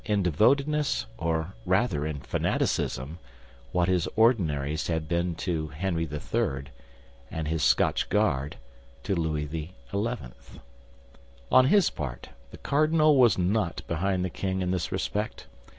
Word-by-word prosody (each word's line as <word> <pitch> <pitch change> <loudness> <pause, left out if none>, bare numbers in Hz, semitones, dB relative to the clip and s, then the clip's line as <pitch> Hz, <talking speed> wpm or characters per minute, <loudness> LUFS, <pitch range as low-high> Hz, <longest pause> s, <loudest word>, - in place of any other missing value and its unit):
in 105 -2 +1
devotedness, 140 - +2
or 80 +2 -1
rather 95 -5 +1
in 75 -2 -4
fanaticism, 70 +3 -1 0.5
what 90 -1 +2
his 90 -3 +1
Ordinaries 80 - +2
had 80 -2 -2
been 85 +1 0
to 80 -3 -2
Henry 80 +2 -2
III., 70 -2 -2 0.6
and 80 -1 -4
his 80 0 -1
Scotch - - +2
Guard 70 +3 +1 0.5
to - - -1
Louis 80 -4 -1
XI. 80 +3 -6 1.8
On 130 0 +7
his 200 +3 +4
part, 65 -5 -6 0.2
the - - -11
cardinal 155 +1 +3
was 125 -5 +5
not 95 -1 0
behind 90 +2 0
the 90 - -4
king 95 0 -2
in 90 - -1
this 90 -3 -2
respect. 105 +1 -3
85 Hz, 130 wpm, -27 LUFS, 80-105 Hz, 1.8 s, On